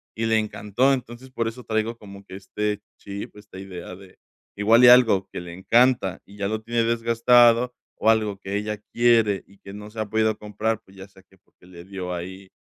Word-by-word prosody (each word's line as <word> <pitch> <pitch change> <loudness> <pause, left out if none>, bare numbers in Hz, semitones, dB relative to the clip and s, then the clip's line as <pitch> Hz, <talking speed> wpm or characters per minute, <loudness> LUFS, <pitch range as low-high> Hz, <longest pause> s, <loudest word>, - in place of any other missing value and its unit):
y 115 - -2
le 110 0 +3
encantó. 110 +5 0
Entonces, 125 0 -6
por 115 -2 -2
eso 120 +2 -7
traigo 110 +1 -2
como 100 -2 -13
que 95 - -11
este 105 +1 -3 0.2
chip, 100 0 -8
esta 105 -2 -14
idea 90 -2 -8
de 95 0 -17 0.4
igual 110 +4 +4
y 125 - +9
algo 115 -6 +5
que - - -6
le 90 -1 -9
encanta 115 +1 +2
y 100 - -16
ya 100 0 -3
lo 110 0 -3
tiene 115 +1 -1
desgastado 115 +1 +3 0.2
o 110 - +2
algo 110 -3 +1
que 100 +1 -4
ella 105 +1 -3
quiere 115 -4 +3
y 100 - -21
que 100 - -12
no 105 +1 -9
se 110 +1 -10
ha 110 - -2
podido 110 0 +1
comprar, 110 +1 -3
pues, 95 0 -20
ya 95 +1 -10
sea 95 -1 -21
que 95 +1 -26
porque 90 - -27
le 90 -1 -13
dio 95 -2 -6
ahí 95 +2 -8
105 Hz, 215 wpm, -23 LUFS, 95-115 Hz, 0.4 s, y